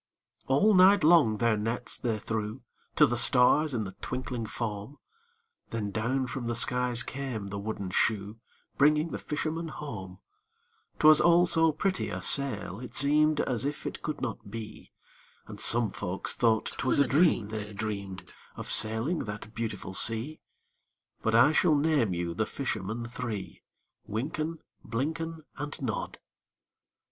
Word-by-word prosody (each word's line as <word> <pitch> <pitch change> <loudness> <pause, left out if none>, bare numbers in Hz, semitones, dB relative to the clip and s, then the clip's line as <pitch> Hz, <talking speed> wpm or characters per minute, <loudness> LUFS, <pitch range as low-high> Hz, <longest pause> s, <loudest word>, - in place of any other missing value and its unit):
All 170 +12 +4
night 190 +1 +6
long 150 -10 +5
their 115 0 +2
nets 115 +3 -3
they 115 -3 -1
threw 110 +3 -4 0.3
To - - +6
the - - -1
stars 140 +3 +4
in 110 - -1
the 95 - -6
twinkling 125 -3 -4
foam,— 110 +3 -5 0.7
Then 105 -3 -3
down 120 +5 -1
from 125 0 -5
the 120 - -1
skies 125 0 +2
came 130 -6 -5
the 100 0 -5
wooden 100 -2 -5
shoe, 105 +2 0 0.4
Bringing 150 +3 +3
the - - -4
fishermen 160 +2 -3
home: 110 -12 -8 0.8
'Twas 155 0 +6
all 175 +1 +5
so 165 -2 +3
pretty 190 +5 -2
a - - -4
sail, 110 -8 0
it 125 - -10
seemed 150 +2 +4
As 125 -2 -2
if 145 +1 -4
it - - -5
could - - -5
not - - -5
be; 110 0 -9 0.5
And - - -10
some 115 -3 +2
folk 95 -1 -5
thought 115 -2 +1
'twas 130 - +1
a 140 - +4
dream 140 - +2
they'd 105 -1 -6
dreamed 100 -3 -5 0.3
Of - - -3
sailing 110 +10 +4
that 105 +1 -8
beautiful 115 -4 -5
sea; 115 +10 +1 0.8
But 110 0 +1
I 120 +6 +6
shall 155 0 +3
name 145 -7 +2
you 85 -1 -3
the 110 +5 -1
fishermen 115 -3 -4
three: 115 -6 -6 0.5
Wynken, 155 +8 -4 0.2
Blynken, 160 +6 -4 0.2
And 145 0 -5
Nod. 120 -6 -4
120 Hz, 150 wpm, -28 LUFS, 110-150 Hz, 0.8 s, night